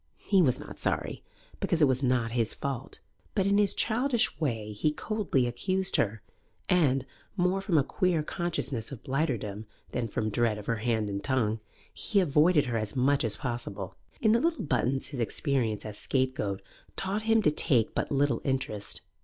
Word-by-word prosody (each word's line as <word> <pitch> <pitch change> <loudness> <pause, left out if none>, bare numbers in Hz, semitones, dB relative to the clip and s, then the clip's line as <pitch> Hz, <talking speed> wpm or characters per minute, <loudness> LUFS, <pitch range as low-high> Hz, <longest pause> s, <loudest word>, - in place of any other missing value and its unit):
He 195 -3 +3
was 130 -7 +3
not - - -10
sorry, - - -1 0.4
because 170 - 0
it 150 - +6
was 130 0 +1
not 125 -3 +1
his 115 -2 0
fault, 135 -2 -5 0.3
but 195 -3 +2
in 200 +1 +3
his 205 -2 +4
childish 240 - +1
way 115 -9 -2
he 130 +9 +1
coldly 200 - 0
excused 185 +10 0
her, 110 0 0 0.4
and, 135 -7 +3 0.3
more 180 +2 +2
from 195 -5 +1
a 140 - +5
queer 170 +1 +1
consciousness 150 - -2
of 135 - -8
blighterdom 120 -7 -2 0.2
than 115 - -1
from 110 0 -2
dread 115 0 +1
of 105 - -8
her 115 - 0
hand 110 -1 0
and 100 0 -4
tongue, 115 -5 +1 0.3
he 205 - 0
avoided 155 -2 +4
her 120 -2 -1
as 110 +2 -4
much 135 +2 +3
as 110 -3 +2
possible. 120 -7 -4 0.2
In 220 - +3
the 230 - +4
little 330 +1 0
Buttons 130 -1 0
his 140 - -6
experience 115 -3 0
as 105 -1 -6
scapegoat 125 -8 -1 0.3
taught 195 +3 -2
him 225 -1 +5
to 150 - +4
take 125 -6 +2
but - - -2
little 140 0 +2
interest. 130 -6 -2
135 Hz, 180 wpm, -29 LUFS, 115-175 Hz, 0.4 s, it